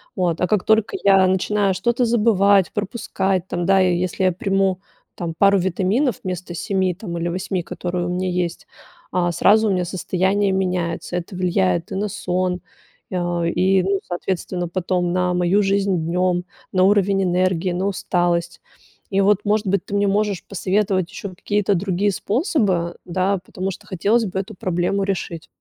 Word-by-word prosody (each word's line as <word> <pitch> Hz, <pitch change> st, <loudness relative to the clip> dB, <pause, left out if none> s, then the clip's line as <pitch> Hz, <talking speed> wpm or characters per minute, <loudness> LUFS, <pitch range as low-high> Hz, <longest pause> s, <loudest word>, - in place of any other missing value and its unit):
от, 175 Hz, -3 st, 0 dB
а 180 Hz, -, +2 dB
как 210 Hz, -1 st, +1 dB
только 220 Hz, 0 st, +2 dB
я 195 Hz, -1 st, +6 dB
начинаю 195 Hz, +1 st, +1 dB
что-то 235 Hz, +6 st, +1 dB
забывать, 205 Hz, -4 st, +3 dB
пропускать, 195 Hz, -3 st, -2 dB
там, 175 Hz, -1 st, -2 dB
да, 195 Hz, 0 st, +4 dB
если 185 Hz, 0 st, +1 dB
я 185 Hz, -, +4 dB
приму, 195 Hz, +1 st, 0 dB, 0.4 s
там, 170 Hz, -2 st, -4 dB
пару 200 Hz, 0 st, +5 dB
витаминов, 190 Hz, -, 0 dB
вместо 180 Hz, -1 st, -5 dB
7, 190 Hz, +1 st, 0 dB
там, 170 Hz, -2 st, -6 dB
или 170 Hz, +1 st, -2 dB
8, 180 Hz, 0 st, -2 dB
которые 175 Hz, 0 st, -3 dB
у -, -, -2 dB
меня 180 Hz, +1 st, -1 dB
есть, 175 Hz, -1 st, -3 dB, 0.4 s
а, 175 Hz, -1 st, +1 dB
сразу 215 Hz, +5 st, +4 dB
у -, -, +2 dB
меня 180 Hz, -1 st, +1 dB
состояние 190 Hz, +3 st, 0 dB
меняется. 180 Hz, -2 st, -2 dB
Это 180 Hz, +2 st, -6 dB
влияет 95 Hz, -, 0 dB
и -, -, -3 dB
на 205 Hz, +2 st, -1 dB
сон, 180 Hz, -1 st, -2 dB, 0.5 s
а, 175 Hz, -1 st, -1 dB
и, 185 Hz, +2 st, +2 dB
ну, 195 Hz, 0 st, +1 dB
соответственно, 175 Hz, 0 st, -3 dB
потом 180 Hz, -1 st, -1 dB
на 180 Hz, -1 st, +1 dB
мою 180 Hz, +3 st, +2 dB
жизнь 195 Hz, -1 st, +1 dB
днем, 180 Hz, +1 st, +1 dB, 0.3 s
на 185 Hz, -1 st, +3 dB
уровень 195 Hz, -1 st, +3 dB
энергии, 180 Hz, 0 st, +1 dB
на 185 Hz, +3 st, -1 dB
усталость. 175 Hz, -2 st, -1 dB, 0.5 s
И, 195 Hz, -, +1 dB
вот, 200 Hz, 0 st, +4 dB
может 210 Hz, +1 st, +1 dB
быть, 195 Hz, -1 st, +1 dB
ты 200 Hz, -, -4 dB
мне 200 Hz, 0 st, +2 dB
можешь 205 Hz, -1 st, 0 dB
посоветовать 190 Hz, -1 st, 0 dB
еще 200 Hz, -, -6 dB
какие-то 205 Hz, +2 st, 0 dB
другие 195 Hz, +2 st, 0 dB
способы, 200 Hz, -, 0 dB
да, 185 Hz, +2 st, 0 dB
потому 190 Hz, +1 st, -4 dB
что -, -, -11 dB
хотелось 210 Hz, +5 st, +1 dB
бы 190 Hz, 0 st, -5 dB
эту 200 Hz, +3 st, -5 dB
проблему 185 Hz, +2 st, -1 dB
решить. 175 Hz, -4 st, -3 dB
185 Hz, 165 wpm, -21 LUFS, 180-200 Hz, 0.5 s, я